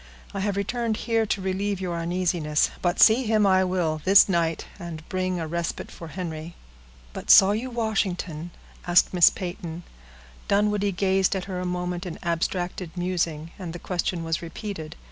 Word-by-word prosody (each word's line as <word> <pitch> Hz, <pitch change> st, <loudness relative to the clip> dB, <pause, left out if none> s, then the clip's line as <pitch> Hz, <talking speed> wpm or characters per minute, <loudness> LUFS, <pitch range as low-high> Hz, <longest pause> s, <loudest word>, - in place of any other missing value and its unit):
I 195 Hz, -, -3 dB
have 200 Hz, 0 st, -1 dB
returned 225 Hz, +2 st, -1 dB
here 225 Hz, -2 st, +1 dB
to 200 Hz, -, -1 dB
relieve 195 Hz, +1 st, -1 dB
your 175 Hz, -3 st, -3 dB
uneasiness, 170 Hz, -3 st, 0 dB
but 175 Hz, 0 st, 0 dB
see 235 Hz, +3 st, +6 dB
him 215 Hz, -1 st, +3 dB
I 190 Hz, -1 st, +4 dB
will 175 Hz, -4 st, -1 dB
this 195 Hz, +2 st, +7 dB
night, 170 Hz, -3 st, 0 dB
and 165 Hz, -3 st, -8 dB
bring 185 Hz, -1 st, -1 dB
a 165 Hz, -, -3 dB
respite 170 Hz, +1 st, -4 dB
for 165 Hz, -, -9 dB
Henry." 165 Hz, -1 st, -6 dB, 0.6 s
"But -, -, -8 dB
saw 195 Hz, +1 st, +8 dB
you 225 Hz, +5 st, -2 dB
Washington?" 190 Hz, -8 st, -2 dB, 0.4 s
asked 175 Hz, +1 st, +4 dB
Miss 175 Hz, -2 st, +7 dB
Peyton. 175 Hz, -2 st, -6 dB, 0.6 s
Dunwoodie 205 Hz, 0 st, +2 dB
gazed 190 Hz, +1 st, +2 dB
at 190 Hz, -, -2 dB
her 185 Hz, -1 st, -4 dB
a 180 Hz, -, -3 dB
moment 180 Hz, +1 st, -3 dB
in 170 Hz, -, -6 dB
abstracted 175 Hz, +1 st, -2 dB
musing, 170 Hz, -3 st, -2 dB
and 175 Hz, -4 st, -6 dB
the -, -, -5 dB
question 175 Hz, 0 st, -2 dB
was 165 Hz, -1 st, -2 dB
repeated. 170 Hz, -2 st, -7 dB
180 Hz, 165 wpm, -25 LUFS, 170-195 Hz, 0.6 s, saw